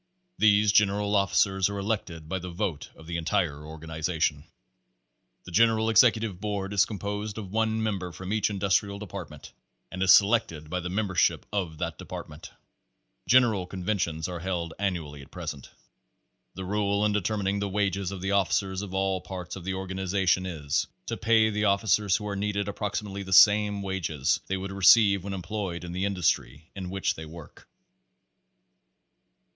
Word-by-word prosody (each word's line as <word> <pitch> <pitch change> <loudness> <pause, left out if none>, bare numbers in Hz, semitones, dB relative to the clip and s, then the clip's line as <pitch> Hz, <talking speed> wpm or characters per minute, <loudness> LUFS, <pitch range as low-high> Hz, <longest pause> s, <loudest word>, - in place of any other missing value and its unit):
These 105 -1 +5
general 105 0 +2
officers 100 -1 +2
are 100 - -4
elected 100 -6 -3
by 95 +4 -2
the 90 +1 -7
vote 85 -4 -3
of 80 - -15
the 85 +1 -3
en 85 - -5
tire 75 -5 0
organization. 80 -1 -2 1.0
The - - -11
General 110 +3 +3
Executive 110 -4 +3
Board 100 -2 -3
is 100 0 +4
composed 105 0 -4
of 100 -4 -7
one 110 +1 0
member 95 -5 -2
from 95 +4 -5
each 110 -1 +1
Industrial 100 0 0
Department 95 -7 -9 0.4
and 95 - -6
is 95 -1 +5
se 100 - +8
lected 85 -9 -1
by 90 - -1
the 90 0 -5
membership 95 -2 +1
of 90 -6 -2
that - - -4
department. - - -8 0.8
General 115 -7 +4
conventions 90 -4 -2
are 90 -1 -5
held 85 -2 -3
annually 85 -8 -3
at 70 - -14
present. 70 - -7 0.9
The 95 +1 -6
rule 100 +1 0
in 105 - +2
determining 100 -1 -1
the 100 0 -2
wages 100 -1 -1
of 95 -2 -6
the 95 +1 -2
officers 95 -1 +1
of 95 -2 -6
all 95 -1 0
parts 90 -2 -7
of 90 -3 -9
the 95 0 -2
organization 95 0 0
is, 75 -5 -1 0.2
to - - -3
pay 110 0 +3
the 105 0 0
officers 100 0 +2
who 105 - -3
are 100 - -3
needed 100 0 -2
approximately 100 -1 -4
the 95 -1 -4
same 105 +1 +6
wages 85 -7 -1
they 95 - -1
would 95 +1 -5
receive 100 0 +5
when 100 0 -5
employed 95 -2 -4
in 85 - -6
the 90 +2 -2
industry 85 -5 -1
in 95 -2 -5
which 95 +1 -1
they 80 - -8
work. 80 -1 -13
95 Hz, 165 wpm, -27 LUFS, 90-105 Hz, 1.0 s, se